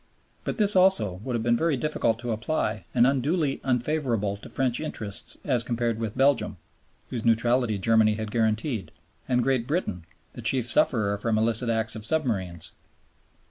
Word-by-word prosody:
But - - -3
this 210 -3 +5
also 180 - +3
would 125 -1 -3
have 115 - -1
been 120 0 +3
very 160 +2 +1
difficult 120 -5 0
to 120 -1 -3
apply 110 - -2
and 120 - +4
unduly 140 +3 0
unfavorable 125 -5 0
to 100 - -12
French 125 -2 0
interests 105 -10 -3
as 125 -5 +2
compared 115 -1 -1
with 110 0 -4
Belgium 135 -7 +2 0.5
(whose 120 -3 -3
neutrality 115 -1 +2
Germany 110 +1 +3
had 110 -1 -5
guaranteed) 110 - -1 0.4
and 125 -1 +2
Great 130 -3 0
Britain 105 - -2 0.3
(the - - -8
chief 125 -3 +1
sufferer 105 -3 +2
from 110 0 0
illicit 115 +2 +1
acts 110 0 +1
of 110 - -7
submarines). 105 - -1
115 Hz, 160 wpm, -26 LUFS, 110-135 Hz, 0.5 s, this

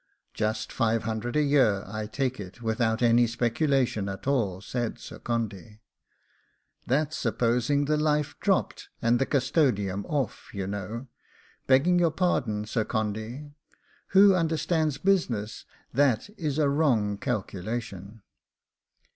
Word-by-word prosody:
'Just 110 +1 -2
five 115 -2 +1
hundred 110 +2 -3
a 150 - +3
year, 130 -9 +3
I 110 +2 -5
take 130 +3 -2
it, 100 +2 -9
without 110 +1 0
any 120 0 +5
speculation 120 -2 0
at 95 - -7
all,' 115 -10 0
said 120 +4 -3
Sir - - -10
Condy. 110 -3 -4 1.1
'That's 150 +4 +1
supposing 125 +3 +1
the 150 +1 +1
life 150 -1 +1
dropt, - - 0
and 120 +1 +2
the 135 - +1
custodiam 120 - +1
off, 140 -8 -3
you 100 -1 -2
know; 105 +5 -5 0.6
begging 155 +7 +4
your 170 -1 +4
pardon, 125 - 0
Sir 110 +1 -1
Condy, 110 +6 -4 0.6
who 195 +1 +6
understands 160 -3 0
business, 125 - 0 0.3
that 135 - +2
is 155 -7 -2
a 150 -2 +3
wrong 120 -9 +1
calculation. 110 -2 -4
120 Hz, 125 wpm, -27 LUFS, 110-145 Hz, 1.1 s, who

